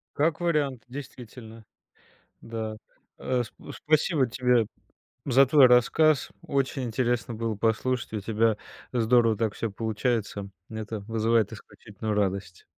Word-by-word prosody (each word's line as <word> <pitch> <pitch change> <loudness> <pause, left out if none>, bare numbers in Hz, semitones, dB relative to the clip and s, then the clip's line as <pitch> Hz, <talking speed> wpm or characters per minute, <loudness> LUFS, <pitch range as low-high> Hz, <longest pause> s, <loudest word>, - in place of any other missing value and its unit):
Как 155 +1 +1
вариант. 145 -8 0
Действительно. 120 -4 -10 0.8
Да. 110 -1 -5 0.4
Э, 125 -1 -1
спа 110 - -12
спасибо 155 -2 +2
тебе 125 -1 +2 0.6
за 135 0 +5
твой 140 0 +7
рассказ. 130 +5 +4
Очень 135 -1 -1
интересно 120 -1 -1
было 115 0 -2
послушать, 115 +3 -1
у 110 - -2
тебя 110 +1 +1 0.4
здорово 115 -2 +3
так 110 -1 -1
всё 115 - -3
получается. 110 -1 -2 0.2
Это 110 -1 -5
вызывает 115 +1 +1
исключительную 110 -1 -6
радость. 100 -3 -2
115 Hz, 115 wpm, -27 LUFS, 110-130 Hz, 0.8 s, твой